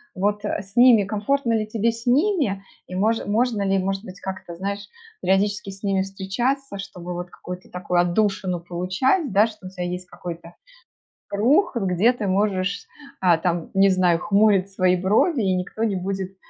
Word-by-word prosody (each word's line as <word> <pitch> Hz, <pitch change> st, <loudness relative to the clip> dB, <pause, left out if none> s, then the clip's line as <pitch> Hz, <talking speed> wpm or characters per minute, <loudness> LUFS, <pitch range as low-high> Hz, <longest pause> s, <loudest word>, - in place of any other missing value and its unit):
Вот, 205 Hz, +2 st, -1 dB
а 205 Hz, -, -1 dB
с 195 Hz, +2 st, -18 dB
ними 240 Hz, -3 st, +7 dB
комфортно 230 Hz, +5 st, 0 dB
ли 220 Hz, -1 st, +1 dB
тебе 225 Hz, +1 st, 0 dB
с 230 Hz, +1 st, -10 dB
ними? 265 Hz, -, +2 dB, 0.2 s
И -, -, -9 dB
мож 220 Hz, +4 st, +1 dB
можно 220 Hz, 0 st, +1 dB
ли, 195 Hz, 0 st, +2 dB
может 195 Hz, +1 st, -2 dB
быть, 190 Hz, -3 st, -10 dB
как-то, 190 Hz, -3 st, -7 dB
знаешь, 200 Hz, +3 st, -4 dB, 0.3 s
периодически 200 Hz, +1 st, +1 dB
с 195 Hz, +1 st, -13 dB
ними 195 Hz, -2 st, +1 dB
встречаться, 200 Hz, +7 st, -2 dB
чтобы 180 Hz, -3 st, -7 dB
вот 175 Hz, +1 st, -6 dB
какую-то 180 Hz, 0 st, -9 dB
такую 180 Hz, -1 st, -1 dB
отдушину 185 Hz, 0 st, 0 dB
получать, 185 Hz, -, 0 dB
да, 205 Hz, +3 st, +5 dB
что 215 Hz, -4 st, -11 dB
у -, -, -7 dB
тебя 180 Hz, -2 st, -4 dB
есть 180 Hz, +1 st, -5 dB
какой-то 170 Hz, -1 st, -8 dB, 0.8 s
круг, 250 Hz, -, +2 dB
где 195 Hz, +2 st, +3 dB
ты 230 Hz, -4 st, -4 dB
можешь, 200 Hz, 0 st, 0 dB, 0.3 s
а, 175 Hz, -3 st, +4 dB
там, 170 Hz, 0 st, -2 dB
не 195 Hz, +1 st, +5 dB
знаю, 185 Hz, -3 st, +3 dB
хмурить 200 Hz, 0 st, +3 dB
свои 185 Hz, -1 st, +2 dB
брови, 215 Hz, -, +2 dB
и 190 Hz, -2 st, +1 dB
никто 185 Hz, +5 st, -3 dB
не 215 Hz, -3 st, 0 dB
будет 190 Hz, 0 st, -4 dB
195 Hz, 175 wpm, -23 LUFS, 185-215 Hz, 0.8 s, ними